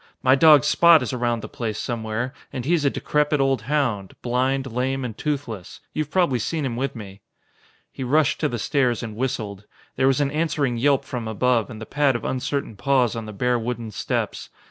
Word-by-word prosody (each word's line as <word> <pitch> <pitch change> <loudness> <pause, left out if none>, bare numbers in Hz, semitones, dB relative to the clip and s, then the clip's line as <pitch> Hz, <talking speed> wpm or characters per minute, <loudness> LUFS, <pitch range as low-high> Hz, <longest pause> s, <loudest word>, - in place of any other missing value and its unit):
My 130 0 +5
dog 150 -1 +7
Spot 170 -4 +6
is 125 - -4
around 120 -2 -1
the - - -5
place 110 -3 -4
somewhere. 115 +2 -3 0.2
And 125 -3 -5
he 165 - +2
is 165 -4 +2
a 140 - +4
decrepit 150 +1 0
old 135 -3 +2
hound, 120 -7 -1
blind, 130 +2 0
lame 130 +2 -1
and 115 -4 -5
toothless. 130 - -4
You've 155 -1 -2
probably 165 -8 +2
seen 155 +6 -2
him 120 -3 -2
with 130 +2 -2
me." 100 -3 -10 0.7
He 130 - -6
rushed 145 +3 +2
to 150 - +1
the 120 - -3
stairs 125 -1 0
and 110 -2 -6
whistled. 110 -5 -3 0.3
There 130 - +3
was 135 0 +3
an 140 -1 +1
answering 150 -5 0
yelp 140 +2 +2
from 120 -3 -5
above 115 +1 +1
and 110 -3 -8
the 110 - -7
pad 140 0 +1
of 120 - -4
uncertain 135 -2 -2
paws 125 0 +2
on 115 -1 -5
the - - -6
bare 125 +4 0
wooden 115 -1 -4
steps. - - -3
125 Hz, 205 wpm, -23 LUFS, 115-140 Hz, 0.7 s, dog